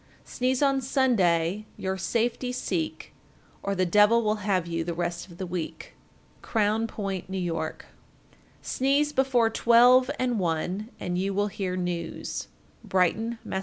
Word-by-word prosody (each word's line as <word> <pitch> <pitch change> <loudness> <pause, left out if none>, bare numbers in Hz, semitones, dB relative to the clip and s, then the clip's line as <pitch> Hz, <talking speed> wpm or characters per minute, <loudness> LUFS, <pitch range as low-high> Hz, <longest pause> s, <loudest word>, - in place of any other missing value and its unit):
Sneeze 255 +2 0
on 275 -1 +3
Sunday, 210 -8 +1
your 190 0 -2
safety 235 +6 -1
seek, 170 -10 -3 0.5
Or 200 0 -2
the 185 0 +2
devil 210 +5 +5
will 215 0 +1
have 195 -4 0
you 165 -1 -2
the 170 0 -4
rest 175 +1 -3
of 170 -2 -14
the 190 - -4
week. 175 -2 -5 0.5
Crown 220 0 +1
Point, 195 -4 -4
N.Y. 185 -2 -2
1430. 160 -1 -4 0.8
Sneeze 280 +3 +1
before 250 -5 +2
twelve 245 +3 +5
and 245 -3 0
one, 180 +5 -2
and 180 0 -2
you 195 +1 -1
will 205 +1 +1
hear 190 -2 -3
news. 175 -2 -4 0.4
_Brighton, 220 +6 +1
Mass. 190 - -3
200 Hz, 145 wpm, -27 LUFS, 180-235 Hz, 0.8 s, devil